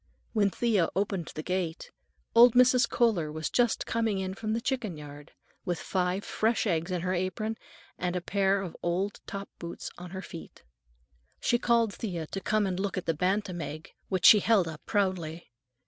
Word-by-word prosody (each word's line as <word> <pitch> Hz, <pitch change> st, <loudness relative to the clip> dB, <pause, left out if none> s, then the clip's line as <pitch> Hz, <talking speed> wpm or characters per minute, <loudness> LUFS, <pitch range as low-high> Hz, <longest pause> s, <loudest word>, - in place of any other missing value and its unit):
When 205 Hz, -3 st, +3 dB
Thea 205 Hz, -5 st, +1 dB
opened 195 Hz, -3 st, -1 dB
the 155 Hz, -, -4 dB
gate, 180 Hz, -2 st, -3 dB, 0.4 s
old 235 Hz, +1 st, +8 dB
Mrs. 250 Hz, -1 st, +5 dB
Kohler 195 Hz, -11 st, +2 dB
was 155 Hz, +1 st, -3 dB
just 240 Hz, -2 st, +2 dB
coming 225 Hz, -3 st, 0 dB
in 190 Hz, 0 st, -2 dB
from 215 Hz, +2 st, -3 dB
the 225 Hz, -, 0 dB
chicken 230 Hz, -, -2 dB
yard, 145 Hz, -1 st, -11 dB, 0.3 s
with 175 Hz, -2 st, -2 dB
five 185 Hz, +1 st, -1 dB
fresh 225 Hz, +2 st, +1 dB
eggs 170 Hz, -3 st, 0 dB
in 180 Hz, -2 st, -1 dB
her 180 Hz, +1 st, -1 dB
apron 185 Hz, +5 st, -2 dB, 0.4 s
and 180 Hz, 0 st, -1 dB
a -, -, +1 dB
pair 195 Hz, +2 st, +1 dB
of 175 Hz, -, -7 dB
old 185 Hz, +4 st, -1 dB
top 200 Hz, 0 st, -6 dB
boots 170 Hz, 0 st, -6 dB
on 180 Hz, 0 st, -8 dB
her 190 Hz, +1 st, -6 dB
feet. 165 Hz, -, -10 dB, 0.8 s
She 240 Hz, -, +2 dB
called 235 Hz, -3 st, +2 dB
Thea 175 Hz, -7 st, -4 dB
to 195 Hz, +5 st, -5 dB
come 215 Hz, +1 st, +1 dB
and 185 Hz, -1 st, -2 dB
look 200 Hz, 0 st, -2 dB
at 180 Hz, -, -4 dB
a 165 Hz, -, +2 dB
bantam 185 Hz, +2 st, -1 dB
egg, 155 Hz, +1 st, -7 dB, 0.2 s
which 185 Hz, -2 st, 0 dB
she 210 Hz, -, +10 dB
held 205 Hz, -4 st, +3 dB
up 155 Hz, -1 st, -7 dB
proudly. 175 Hz, -, -1 dB
190 Hz, 185 wpm, -29 LUFS, 175-215 Hz, 0.8 s, she